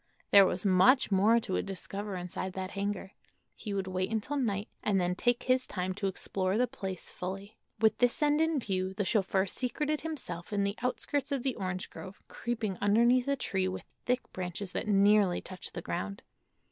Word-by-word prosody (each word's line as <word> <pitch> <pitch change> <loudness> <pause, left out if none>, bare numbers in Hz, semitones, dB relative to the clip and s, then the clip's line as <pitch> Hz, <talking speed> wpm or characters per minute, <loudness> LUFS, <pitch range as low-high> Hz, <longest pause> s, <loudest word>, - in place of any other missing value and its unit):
There 200 -1 +9
was 180 +2 -2
much 200 +7 +5
more 210 +5 +5
to 190 - -1
discover 195 +1 -5
inside 180 +1 -4
that 190 0 -4
hangar. 200 -1 -3 0.4
He 215 - -6
would 195 -1 -1
wait 185 0 -1
until 225 +6 -2
night, 210 -7 -1
and 200 -2 +2
then 180 0 +1
take 240 +6 +1
his 255 0 +2
time 185 -1 -2
to 200 +1 -2
explore 190 +1 -1
the 250 - +4
place 190 -6 -5
fully. 195 +4 -6 0.2
With 220 -1 +3
this 245 -1 +3
end 295 +1 +3
in 320 -1 +2
view 190 -4 -2
the 205 -1 -1
chauffeur 190 -2 +2
secreted 290 +8 -1
himself 255 - -5
in 200 -1 +1
the 200 0 0
outskirts 275 +3 -1
of 275 -3 -1
the 265 - +1
orange 185 -3 -4
grove, 190 +2 -9
creeping 220 -5 -3
underneath 235 +5 +4
a 280 - +2
tree 190 -7 0
with 185 - -4 0.2
thick 250 0 +2
branches 180 +1 -4
that - - -3
nearly 200 -2 +4
touched 185 -1 -7
the - - -5
ground. 95 +3 -4
200 Hz, 185 wpm, -31 LUFS, 185-240 Hz, 0.4 s, There